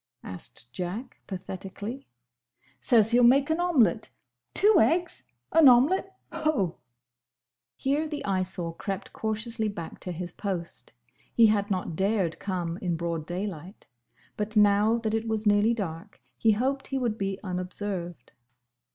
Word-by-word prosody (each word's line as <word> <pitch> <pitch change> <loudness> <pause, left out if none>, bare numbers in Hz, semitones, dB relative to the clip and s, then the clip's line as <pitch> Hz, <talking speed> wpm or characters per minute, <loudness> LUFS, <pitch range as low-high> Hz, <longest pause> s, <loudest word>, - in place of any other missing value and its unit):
asked 115 +6 -9
Jack 195 +8 -5
pathetically. 195 +6 -7 0.7
"Says 225 -2 +4
he'll 240 +1 +5
make 275 +5 +5
an 320 - +1
omelette! 285 - +2 0.5
Two 415 0 +5
eggs! 350 +2 +1 0.3
An 320 -4 +8
omelette! 370 +10 +3 0.2
Ho!" 310 - 0 1.0
Here 285 +3 0
the 300 -2 -5
Eyesore 185 -3 -1
crept 195 +2 -5
cautiously 220 0 -1
back 170 -6 -7
to 180 - -5
his 175 0 -5
post. 175 - -5 0.4
He 230 - +7
had 210 -1 +2
not 185 -4 -2
dared 190 -2 0
come 175 -3 -3
in 175 -3 -1
broad 165 -2 -3
daylight, 185 0 -6 0.5
but 210 +1 -2
now 210 +2 +4
that 220 -2 -2
it 225 +1 -1
was 220 -1 -1
nearly 210 +3 +4
dark 190 -1 -6 0.2
he 220 -1 +3
hoped 265 +5 -1
he 270 - -2
would 235 -4 -1
be 195 0 -2
unobserved. 180 -4 -5
205 Hz, 135 wpm, -27 LUFS, 180-240 Hz, 1.0 s, An